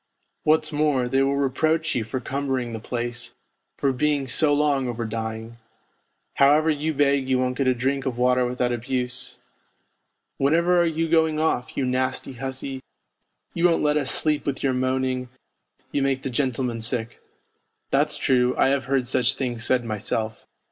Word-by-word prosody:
What's 155 Hz, +2 st, +3 dB
more, 145 Hz, -4 st, +1 dB
they 135 Hz, +2 st, +2 dB
will 135 Hz, +1 st, +2 dB
reproach 155 Hz, +4 st, +1 dB
you 120 Hz, -, 0 dB
for 110 Hz, +4 st, -4 dB
cumbering 130 Hz, -2 st, -2 dB
the 110 Hz, -, -4 dB
place, 120 Hz, +1 st, -5 dB, 0.4 s
for 135 Hz, -1 st, +1 dB
being 145 Hz, +1 st, +1 dB
so 145 Hz, +4 st, +3 dB
long 145 Hz, -3 st, +2 dB
over 120 Hz, -1 st, -3 dB
dying. 110 Hz, +1 st, -5 dB, 0.8 s
How 140 Hz, +1 st, +6 dB
ever 155 Hz, +1 st, +2 dB
you 155 Hz, +1 st, -1 dB
beg 140 Hz, -2 st, +2 dB
you 130 Hz, -, +3 dB
won't 125 Hz, 0 st, 0 dB
get 135 Hz, 0 st, 0 dB
a 130 Hz, -, +3 dB
drink 135 Hz, +2 st, -1 dB
of 125 Hz, -2 st, -3 dB
water 125 Hz, 0 st, +3 dB
without 125 Hz, 0 st, -1 dB
abuse: 125 Hz, 0 st, -3 dB, 0.5 s
' -, -, -51 dB
Whenever 170 Hz, +5 st, +3 dB
are 170 Hz, -, +3 dB
you 165 Hz, 0 st, -1 dB
going 160 Hz, -1 st, +2 dB
off, 155 Hz, -5 st, -1 dB
you 135 Hz, -, +1 dB
nasty 130 Hz, +1 st, -1 dB
hussy, 130 Hz, +1 st, -5 dB, 0.7 s
you 170 Hz, -, -2 dB
won't 170 Hz, -2 st, +3 dB
let 150 Hz, 0 st, +2 dB
us 140 Hz, -3 st, 0 dB
sleep 150 Hz, -2 st, 0 dB
with 140 Hz, -, -2 dB
your 135 Hz, -2 st, +2 dB
moaning, 130 Hz, 0 st, -1 dB, 0.6 s
you 140 Hz, -, 0 dB
make 135 Hz, -1 st, 0 dB
the 135 Hz, -, -3 dB
gentlemen 125 Hz, -2 st, -1 dB
sick.' 115 Hz, 0 st, -4 dB, 0.7 s
That's -, -, +2 dB
true, 125 Hz, -1 st, +2 dB
I -, -, +4 dB
have 135 Hz, -2 st, 0 dB
heard 135 Hz, -1 st, +1 dB
such 125 Hz, +1 st, +1 dB
things 120 Hz, -4 st, -3 dB
said 125 Hz, -1 st, +1 dB
myself. 110 Hz, 0 st, -3 dB
130 Hz, 175 wpm, -24 LUFS, 125-145 Hz, 0.8 s, How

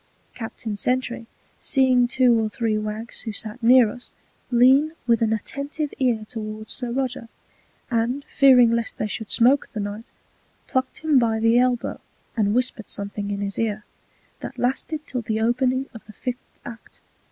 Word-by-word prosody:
Captain 225 Hz, -2 st, -6 dB
Sentry 245 Hz, +1 st, -1 dB, 0.3 s
seeing 255 Hz, -2 st, +3 dB
two 240 Hz, -2 st, +3 dB
or 215 Hz, -, -1 dB
three 225 Hz, 0 st, -1 dB
Waggs 215 Hz, +2 st, -3 dB
who 225 Hz, -, -4 dB
sat 215 Hz, +3 st, -5 dB
near 245 Hz, 0 st, +6 dB
us, 245 Hz, -, -9 dB, 0.4 s
lean 265 Hz, +6 st, +5 dB
with 235 Hz, -2 st, +2 dB
an 225 Hz, -1 st, +2 dB
attentive 280 Hz, +7 st, -3 dB
Ear 240 Hz, -5 st, +1 dB
towards 215 Hz, -1 st, -6 dB
Sir 245 Hz, -2 st, -4 dB
Roger, 250 Hz, -2 st, -3 dB, 0.6 s
and 240 Hz, +4 st, 0 dB
fearing 250 Hz, -4 st, +5 dB
lest 230 Hz, -1 st, -1 dB
they -, -, -1 dB
should 215 Hz, 0 st, -5 dB
Smoke 260 Hz, +4 st, +4 dB
the 215 Hz, -, -5 dB
Knight, 205 Hz, +2 st, -5 dB, 0.6 s
pluck'd 260 Hz, 0 st, -2 dB
him 305 Hz, -4 st, +4 dB
by 225 Hz, -2 st, +1 dB
the 225 Hz, +2 st, +4 dB
Elbow, 250 Hz, -1 st, 0 dB, 0.3 s
and 210 Hz, -2 st, +1 dB
whisper'd 245 Hz, -3 st, -1 dB
something 200 Hz, 0 st, -4 dB
in 200 Hz, 0 st, -3 dB
his 200 Hz, 0 st, -3 dB
Ear, 215 Hz, -2 st, -2 dB, 0.5 s
that -, -, -8 dB
lasted 300 Hz, +5 st, -2 dB
till 250 Hz, -3 st, -3 dB
the 220 Hz, -1 st, -2 dB
Opening 255 Hz, +3 st, +1 dB
of 225 Hz, -, -11 dB
the 215 Hz, -, -12 dB
Fifth 250 Hz, +3 st, -6 dB, 0.2 s
Act. 235 Hz, -1 st, -11 dB
235 Hz, 165 wpm, -23 LUFS, 220-255 Hz, 0.6 s, near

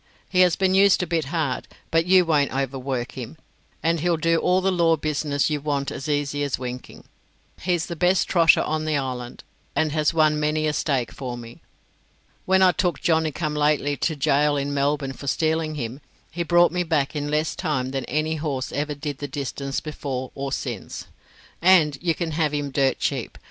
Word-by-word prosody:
He 185 Hz, -, 0 dB
has 180 Hz, -2 st, +5 dB
been 190 Hz, -1 st, +1 dB
used 195 Hz, -1 st, +5 dB
a -, -, -1 dB
bit 165 Hz, -3 st, -1 dB
hard, 145 Hz, -4 st, -2 dB, 0.2 s
but 165 Hz, +1 st, +2 dB
you 185 Hz, -1 st, +6 dB
won't 150 Hz, -4 st, +2 dB
overwork 135 Hz, -1 st, -3 dB
him, 130 Hz, +4 st, -8 dB, 0.5 s
and 165 Hz, 0 st, +2 dB
he'll 170 Hz, +1 st, +1 dB
do 165 Hz, +1 st, +2 dB
all 180 Hz, +2 st, +2 dB
the 190 Hz, +1 st, +1 dB
law 170 Hz, -2 st, +3 dB
business 150 Hz, -1 st, -1 dB
you 150 Hz, -1 st, -1 dB
want 140 Hz, -1 st, -1 dB
as 135 Hz, +2 st, -6 dB
easy 145 Hz, -1 st, -1 dB
as 140 Hz, -2 st, -1 dB
winking. 125 Hz, 0 st, -7 dB, 0.6 s
He's 175 Hz, -2 st, 0 dB
the 170 Hz, -, -6 dB
best 180 Hz, +2 st, +2 dB
trotter 165 Hz, -3 st, +5 dB
on 155 Hz, 0 st, -2 dB
the 155 Hz, -2 st, +1 dB
island, 125 Hz, -3 st, -5 dB, 0.3 s
and 155 Hz, -1 st, +1 dB
has 155 Hz, -1 st, +2 dB
won 155 Hz, -2 st, +3 dB
many 155 Hz, +1 st, 0 dB
a 155 Hz, -, +1 dB
stake 135 Hz, -6 st, -1 dB
for 125 Hz, -3 st, -6 dB
me. 115 Hz, 0 st, -11 dB, 0.9 s
When 190 Hz, 0 st, +4 dB
I 185 Hz, -, +6 dB
took 180 Hz, -1 st, -1 dB
Johnny 160 Hz, -3 st, +1 dB
come 150 Hz, 0 st, -3 dB
lately 150 Hz, -1 st, +1 dB
to 160 Hz, -, -1 dB
gaol 145 Hz, 0 st, +2 dB
in 140 Hz, +1 st, -2 dB
Melbourne 140 Hz, -1 st, 0 dB
for 140 Hz, -, -10 dB
stealing 160 Hz, +1 st, 0 dB
him, 130 Hz, 0 st, -5 dB, 0.3 s
he 175 Hz, -, -4 dB
brought 175 Hz, +1 st, +4 dB
me 180 Hz, -, -1 dB
back 155 Hz, -4 st, 0 dB
in 145 Hz, 0 st, -2 dB
less 155 Hz, +1 st, 0 dB
time 130 Hz, -4 st, -2 dB
than 135 Hz, -2 st, -3 dB
any 155 Hz, +4 st, -1 dB
horse 145 Hz, -4 st, -3 dB
ever 150 Hz, +2 st, -2 dB
did 145 Hz, -1 st, -5 dB
the 145 Hz, -, -4 dB
distance 140 Hz, -1 st, -4 dB
before 135 Hz, -4 st, -5 dB
or 140 Hz, 0 st, -4 dB
since. 120 Hz, -6 st, -5 dB, 0.6 s
And 165 Hz, -6 st, +5 dB
you 170 Hz, -2 st, +1 dB
can 170 Hz, -2 st, -3 dB
have 155 Hz, -1 st, 0 dB
him 145 Hz, -1 st, -2 dB
dirt 135 Hz, -1 st, +2 dB
cheap. -, -, -3 dB
150 Hz, 195 wpm, -23 LUFS, 140-165 Hz, 0.9 s, you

